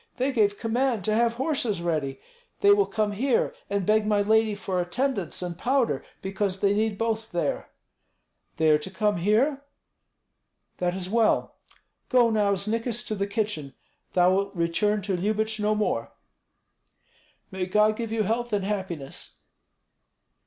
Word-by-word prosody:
They 265 +2 +1
gave 205 -5 +2
command 235 -2 0
to 215 - +1
have 230 +1 +2
horses 250 - -1
ready. 155 -6 -2 0.4
They 405 - +6
will 405 0 +4
come 215 -1 0
here 245 +5 +1 0.2
and 200 -2 -1
beg 215 +1 +3
my 205 -1 +3
lady 220 0 +3
for 190 -3 -2
attendants 190 - -2
and 175 -1 -4
powder, 255 +6 +1 0.2
because 195 0 -2
they 200 0 +3
need 215 0 0
both 225 0 -2
there." 175 - -2 0.9
"They 160 -1 +4
are 150 - +4
to 150 - -7
come 205 +1 0
here? 240 - +2 1.2
That 180 0 0
is 185 -1 -4
well. 225 +2 +2 0.5
Go 240 -2 +4
now, 205 -2 +2
Znikis, 230 +4 -2
to - - -1
the 200 -1 -1
kitchen. 200 - -3 0.4
Thou 180 0 +4
wilt 200 +1 -1
return 195 +5 +1
to 195 -1 -1
Lyubich 215 +4 -1
no 210 +1 +1
more." 210 0 -1 1.4
"May 190 -1 -3
God 210 +3 +3
give 230 -1 -4
you 225 -1 +1
health 235 +3 -1
and 200 -2 0
happiness!" 185 -9 -5
210 Hz, 150 wpm, -26 LUFS, 190-225 Hz, 1.4 s, They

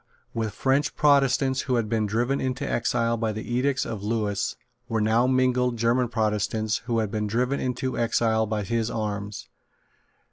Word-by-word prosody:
With 110 -2 -3
French 140 +2 +1
Protestants 135 -2 +3
who 130 - +1
had 115 -2 0
been 110 -1 0
driven 120 +6 0
into 130 -1 -2
exile 115 0 0
by 110 -1 -1
the 110 +3 -5
edicts 130 +2 +1
of 110 -4 -5
Lewis 105 -2 -1 0.3
were 115 -1 0
now 110 +3 +3
mingled 125 -1 +2
German 120 +2 +2
Protestants 110 -1 0
who 115 -2 0
had 110 -3 0
been 105 -1 -1
driven 125 +6 0
into 130 +1 -2
exile 115 -1 +2
by 105 -1 -2
his 115 +2 -1
arms. 105 -3 -4
115 Hz, 165 wpm, -25 LUFS, 110-125 Hz, 0.3 s, Protestants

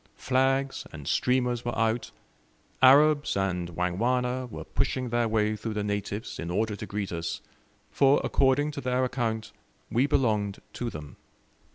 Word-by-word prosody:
Flags 135 +1 0
and 75 -4 -9
streamers 125 -1 +1
were 120 -2 -3
out; 115 +1 0 0.7
Arabs 145 0 +5
and 90 -3 -1
Wangwana 125 +8 0
were - - -7
pushing 130 -2 -1
their 120 0 +1
way 110 -1 +1
through 110 +1 -5
the 105 - -1
natives 105 +2 -4
in 85 - -4
order 105 +4 0
to - - -7
greet 100 -2 -3
us, 85 -1 -3 0.5
for 140 0 +4
according 140 +2 +2
to 145 -1 -6
their 125 0 0
account, 115 -3 -2 0.4
we 125 +4 +3
belonged 105 -7 +1
to 120 - -3
them. 75 -7 -9
120 Hz, 150 wpm, -27 LUFS, 105-130 Hz, 0.7 s, Arabs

